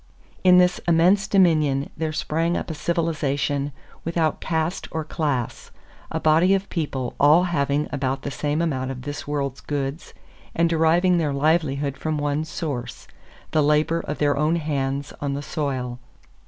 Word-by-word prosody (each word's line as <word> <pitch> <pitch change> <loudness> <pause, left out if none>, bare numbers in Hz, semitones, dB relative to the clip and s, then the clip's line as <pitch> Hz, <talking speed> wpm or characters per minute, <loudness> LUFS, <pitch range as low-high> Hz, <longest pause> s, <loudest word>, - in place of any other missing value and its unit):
In 180 -1 +7
this 180 0 +4
immense 180 +4 +4
dominion 155 -7 +3
there 160 0 -2
sprang 165 +2 -1
up - - -4
a - - -3
civilization 145 -4 -1 0.3
without 165 -1 0
caste 160 +2 -1
or 160 -1 -3
class 145 -6 -3 0.4
a - - -2
body 165 +5 +4
of 195 0 -3
people 135 -6 -2
all 150 +5 +6
having 145 -4 0
about 135 -1 -2
the 140 - -3
same 150 +3 -1
amount 130 -5 -1
of 130 -1 -6
this 145 +1 -6
world's 140 -2 -2
goods 145 +2 -4 0.4
and 170 0 +3
deriving 170 +2 +3
their 150 -4 0
livelihood 140 -2 +1
from 155 -1 -2
one 145 +1 -1
source: 140 -7 -5 0.4
the 155 - +3
labor 150 +3 +2
of 150 - -5
their 145 -1 +2
own 150 +4 +2
hands 140 -3 -2
on 140 -1 -1
the 145 - -4
soil. 130 -5 -3
150 Hz, 155 wpm, -23 LUFS, 140-165 Hz, 0.4 s, In